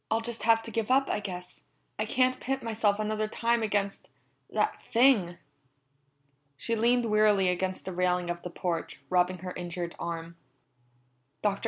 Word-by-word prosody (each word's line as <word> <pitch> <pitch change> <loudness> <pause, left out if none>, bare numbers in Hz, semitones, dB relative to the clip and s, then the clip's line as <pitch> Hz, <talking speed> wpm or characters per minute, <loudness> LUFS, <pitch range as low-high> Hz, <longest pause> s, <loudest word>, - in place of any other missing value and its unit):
"I'll 225 +1 +1
just 235 0 -5
have 225 0 +4
to 230 - -7
give 225 0 -2
up, 270 +1 +3
I - - 0
guess; 180 -3 -7 0.4
I 215 - +1
can't 255 +3 +2
pit 270 +1 -2
myself 220 -3 +1
another 215 0 -1
time 235 +2 +1
against 205 -2 -1 0.4
that - - 0
thing." 225 -8 +3 1.2
She 230 - -1
leaned 240 +2 +3
wearily 210 -3 +4
against 185 +1 -2
the 190 - -4
railing 180 0 +1
of 175 0 -5
the 180 - -6
porch, 170 -1 -3
rubbing 180 0 +3
her 180 - -4
injured 175 -1 -5
arm. 170 0 -5 1.1
"Dr. 200 -1 +1
210 Hz, 160 wpm, -29 LUFS, 180-230 Hz, 1.2 s, have